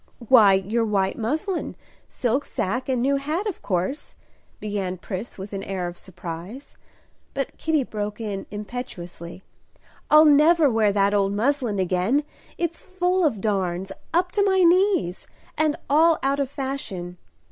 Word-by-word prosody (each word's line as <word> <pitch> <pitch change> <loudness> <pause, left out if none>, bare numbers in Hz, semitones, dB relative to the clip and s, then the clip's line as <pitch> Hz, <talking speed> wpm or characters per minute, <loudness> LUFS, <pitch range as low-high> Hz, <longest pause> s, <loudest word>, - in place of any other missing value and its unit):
"Why, 215 -6 +7
your 205 +5 +1
white 195 -3 0
muslin, 315 - -2 0.3
silk 255 +3 0
sacque, 250 +4 -3
and 250 -2 +1
new 275 +1 +2
hat, 305 +8 -2
of 415 -5 -4
course," 185 - -2 0.4
began 200 -3 -3
Pris 190 +4 -6
with 195 +2 -8
an 195 - -3
air 190 -2 -3
of 175 - -7
surprise. 180 - -9 0.6
But 275 -1 -3
Kitty 315 -3 +1
broke 210 -2 -5
in 205 -3 -4
impetuously, 190 -5 -7 0.7
"I'll 305 +1 +8
never 300 0 +5
wear 220 -2 +3
that 200 0 +2
old 200 -1 +2
muslin 240 0 0
again; 185 +9 +1 0.3
it's 340 -1 -2
full 370 0 0
of 230 - +1
darns, 190 -3 -1 0.2
up 360 +2 +1
to 405 - +2
my 380 -1 +3
knees, 355 - +3 0.3
and 310 0 +1
all 320 +3 +4
out 275 +1 +1
of 275 -2 0
fashion. 245 -11 -5
230 Hz, 145 wpm, -24 LUFS, 195-300 Hz, 0.7 s, I'll